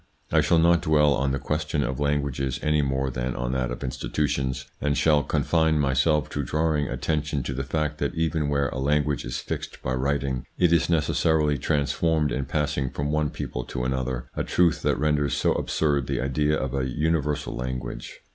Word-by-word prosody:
I - - +5
shall 85 - +3
not 85 0 +4
dwell 75 -2 +4
on 70 -1 0
the 70 - 0
question 75 +2 -1
of 65 +2 -3
languages 70 -2 -1
any 75 -1 +3
more 65 -1 -1
than 65 0 -3
on - - -2
that 65 -2 -1
of 60 +2 -5
institutions, 65 0 -2 0.2
and 75 0 +1
shall 75 -2 +4
confine 80 +1 +1
myself 70 +1 +2
to 70 - -2
drawing 75 +1 0
attention 75 -2 -1
to 65 - -3
the 70 +1 -3
fact 75 +2 -2
that - - -1
even 80 -2 0
where 70 -2 +1
a 65 - -5
language 75 0 +1
is - - -3
fixed - - -5
by 65 - -1
writing, 65 -1 -1
it 90 -2 +4
is 85 0 +3
necessarily 80 -2 +2
transformed 75 +2 +1
in 65 +1 -1
passing 70 -1 -1
from 70 +3 -3
one 75 -1 +1
people 65 - -5
to 60 - -4
another, 65 -1 -2
a - - -1
truth 85 -3 +2
that - - +1
renders 75 -1 +1
so - - +2
absurd 70 -4 0
the - - -1
idea 75 +3 +1
of 65 -2 -3
an 65 -1 0
universal 75 +2 -1
language. 60 -1 -5
70 Hz, 190 wpm, -25 LUFS, 65-75 Hz, 0.2 s, I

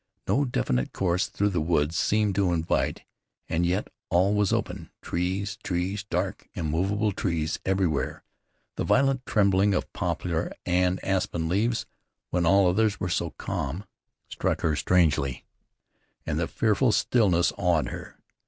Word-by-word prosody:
No 140 +2 +2
definite 65 - -1
course 90 -1 +1
through 100 +1 0
the 85 -4 0
woods 80 -1 +1
seemed 105 +4 +2
to 95 -2 +2
invite, 80 -1 0 0.4
and 85 +1 +1
yet 95 +4 -1 0.2
all 95 +4 +3
was 105 -2 +2
open. - - -2
Trees, 95 +3 -2
trees, 95 +3 -2
dark, 100 - -3
immovable 95 +7 0
trees 85 -4 -2
everywhere. 95 -6 0 0.5
The - - 0
violent 135 -1 +2
trembling 100 -1 +3
of - - -3
poplar 85 -1 -2
and 90 +1 +2
aspen 90 -4 0
leaves, 110 +7 0 0.5
when 85 -1 +1
all 100 +2 +5
others 105 +3 +2
were 90 - -2
so 85 -1 0
calm, 75 +8 -3 0.4
struck - - -2
her 80 -2 +1
strangely, 75 -5 +1 0.8
and - - -1
the - - 0
fearful 115 +2 +2
stillness 100 -5 +2
awed 90 -5 +1
her. - - -8
90 Hz, 140 wpm, -26 LUFS, 85-100 Hz, 0.8 s, all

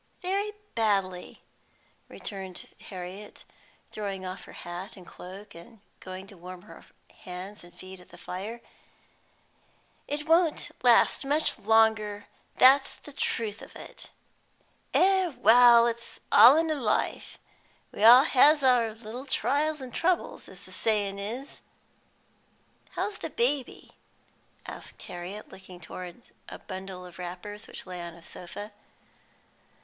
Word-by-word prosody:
"Very 400 +3 -1 0.2
badly," 195 -5 -1 0.7
returned 190 -3 -7 0.2
Harriet, 185 +2 -8 0.5
throwing 195 -3 -5
off 185 +1 -7
her - - -13
hat 180 +5 -8
and 185 - -13
cloak, 195 +5 -11
and 210 +7 -14 0.2
going 185 +1 -8
to 195 - -14
warm 180 +1 -10
her 215 - -14 0.4
hands 190 0 -8
and 175 - -15
feet 185 +1 -12
at 180 - -17
the - - -14
fire. 210 +6 -6 1.5
"It 295 +2 -4
won't 330 -1 +3
last 245 +2 +5
much 295 +3 0
longer, 215 -1 +3 0.3
that's 270 +2 +6
the 295 - -13
truth 220 -6 -2
of - - -13
it." - - -10 0.8
"Eh 380 0 +4
well, 235 0 +7
it's 235 0 -4
all 265 +5 +9
in 325 0 +1
a 295 -3 -2
life; 215 - -1 0.5
we - - -4
all 245 +4 +10
has 295 +1 +5
our 240 -4 +3
little 235 +4 -8
trials 295 +2 0
an' 255 - -8
troubles, 355 +6 -1
as - - -10
the - - -13
sayin' 205 -3 0
is." 235 +8 -6 1.3
"How's 420 0 -3
the - - -4
baby?" 290 - -1 0.7
asked - - -10
Harriet 180 +4 -8
looking 185 -2 -12
towards 180 +4 -9 0.2
a - - -8
bundle 185 -1 -8
of 180 0 -13
wrappers 185 +4 -7
which - - -7
lay 180 -1 -7
on 170 -1 -7
a 170 - -16
sofa. 205 +5 -9
210 Hz, 135 wpm, -28 LUFS, 185-260 Hz, 1.5 s, all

